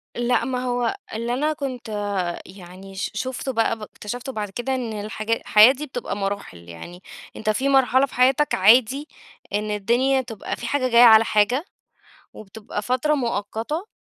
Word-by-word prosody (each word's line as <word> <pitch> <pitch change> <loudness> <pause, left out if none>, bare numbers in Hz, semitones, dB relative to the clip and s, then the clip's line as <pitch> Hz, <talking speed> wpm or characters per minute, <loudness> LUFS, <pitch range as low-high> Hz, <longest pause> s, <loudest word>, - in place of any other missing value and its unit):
لأ، 240 -1 +1
ما 250 0 -2
هو 245 +7 -1 0.2
اللي 230 +2 -2
أنا 300 +5 0
كنت 260 -6 -6
آآ، 205 -1 -3 0.4
يعني 185 +1 -12
ش 190 - -3
شُفته 260 +4 -4
بقى، 230 -1 0
ب - - -13
اكتشِفته 245 +5 -7
بعد 210 -4 -4
كده 240 +6 -3
إن 245 -3 -3
الحاجا 215 +1 -2
الحياة 215 +3 +6
دي 290 +3 -7
بتبقى 245 -6 -5
مراحِل، 200 - -4
يعني 175 - -10 0.3
أنت 215 - -1
في 260 +6 0
مرحلة 265 0 +4
في - - -15
حياتك 265 +4 +3
عادي 250 +8 +4 0.5
إن 210 +1 -1
الدنيا 240 +6 +1
تبقى 230 -5 -6
في 240 - -6
حاجة 255 0 0
جاية 235 0 +6
على 225 -1 +8
حاجة 225 +9 +1 0.7
وبتبقى 210 0 -8
فترة 255 +6 +1
مؤقّتة 235 - -3
235 Hz, 165 wpm, -22 LUFS, 210-260 Hz, 0.7 s, على